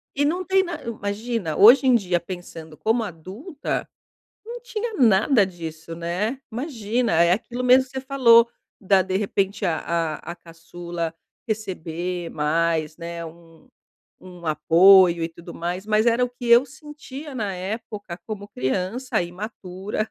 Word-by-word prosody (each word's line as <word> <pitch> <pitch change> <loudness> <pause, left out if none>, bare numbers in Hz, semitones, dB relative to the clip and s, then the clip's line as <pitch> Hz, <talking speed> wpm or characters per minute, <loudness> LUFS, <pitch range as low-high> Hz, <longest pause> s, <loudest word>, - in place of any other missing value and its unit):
E 285 - +1
não 350 +6 0
tem 385 +1 +3
na 345 -4 -6
Imagina, 215 -5 -3
hoje 245 +7 +8
em 255 - +6
dia 180 -6 +1
pensando 170 -3 -9
como 225 +1 +1
adulta, 205 - -5 0.6
não 475 +1 -7
tinha 475 -2 -4
nada 225 - +4
disso, 165 -2 -8
né. 180 +10 -2
Imagina, 235 -2 -2
é 170 - +3
aquilo 245 +4 -4
mesmo 255 +1 +5
que 260 - -21
você 265 0 -4
falou, 235 -4 +5 0.3
da 195 -2 +3
de 190 0 -1
repente 200 0 -1
a 165 -3 0
a 165 -2 -1 0.2
a - - -8
caçula 170 0 -7 0.3
receber 180 -5 -4
mais, 155 +1 0
né, 170 0 -6
um 165 0 -15 0.6
um 180 -2 -12
apoio 170 +3 +6
e - - -2
tudo 170 +1 -12
mais, 180 +3 -4
mas 215 0 +2
era 235 +1 +3
o 250 - +2
que 245 0 -11
eu 235 +3 +6
sentia 295 0 -10
na 210 -6 -3
época 200 -1 -6
como 210 -2 -6
criança, 190 - -2
imatura, 190 +2 -5
195 Hz, 150 wpm, -23 LUFS, 170-245 Hz, 0.6 s, hoje